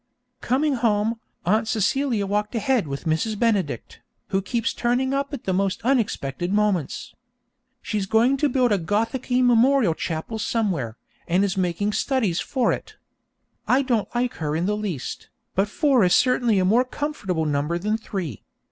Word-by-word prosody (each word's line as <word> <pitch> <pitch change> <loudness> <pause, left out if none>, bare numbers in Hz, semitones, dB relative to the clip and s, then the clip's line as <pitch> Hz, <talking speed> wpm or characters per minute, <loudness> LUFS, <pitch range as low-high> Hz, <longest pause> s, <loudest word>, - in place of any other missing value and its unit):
Coming 275 +2 +1
home, 225 -1 +1 0.3
Aunt 215 +5 +2
Celia 225 +1 +1
walked 210 +3 -1
ahead 230 - +1
with 140 0 -5
Mrs. 165 +7 0
Benedict, 195 - -1 0.3
who 195 - +1
keeps 230 +3 -1
turning 250 +2 0
up 280 +1 -1
at 280 -5 -6
the 190 - -1
most 195 +1 0
unexpected 195 - 0
moments. 205 -8 0 0.7
She's 205 -3 -2
going 230 +6 +3
to 295 +1 +2
build 250 -2 +2
a 205 - +3
Gothicky 230 +8 0
memorial 245 -4 +4
chapel 165 +8 -4
somewhere, 175 - -1 0.3
and 180 +3 +2
is 195 -2 0
making 190 +3 0
studies 220 -12 0
for 260 -3 +1
it. - - -7 0.7
I 265 +2 +3
don't 240 -5 0
like 245 0 0
her 150 -1 -2
in 165 +2 0
the 210 +2 +1
least, 190 - -5 0.2
but 195 +2 +1
four 270 -1 +3
is 180 - +4
certainly 245 -4 +3
a 185 - +3
more 225 +7 +4
comfortable 255 - -3
number 150 +3 0
than 210 +5 0
three. 185 - -5
210 Hz, 160 wpm, -23 LUFS, 185-245 Hz, 0.7 s, memorial